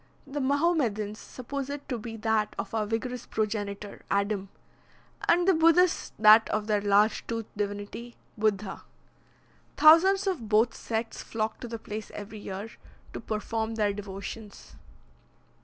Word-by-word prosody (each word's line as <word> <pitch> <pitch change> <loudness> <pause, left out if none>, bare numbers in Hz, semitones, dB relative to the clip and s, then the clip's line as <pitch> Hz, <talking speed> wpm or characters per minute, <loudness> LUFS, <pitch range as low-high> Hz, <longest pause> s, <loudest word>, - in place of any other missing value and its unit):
The 285 +1 -4
Mahomedans 260 -8 +1
suppose 275 +2 -6
it 285 0 -6
to 245 -4 -3
be 225 +1 -7
that 220 -1 0
of 195 +1 -5
our 215 -2 0
vigorous 245 +2 -3
progenitor, 205 -2 -3
Adam, 200 -1 0 0.8
and 350 +1 +4
the 385 - +6
Buddhists 335 +2 +4
that 215 +1 +7
of 215 0 -1
their 210 -1 +1
large 205 +2 +3
toothed 230 -2 -5
divinity, 205 +3 -5 0.2
Buddha. 210 -2 -1 1.0
Thousands 355 +6 +7
of 330 - -2
both 220 +2 +4
sects 225 0 -4
flock 220 -1 -3
to 245 - -6
the 230 0 -5
place 215 0 -7
every 210 +1 -7
year, 200 +1 -6 0.5
to - - -5
perform 220 +1 -3
their 210 -2 +1
devotions. 200 +1 -8
220 Hz, 140 wpm, -28 LUFS, 210-255 Hz, 1.0 s, that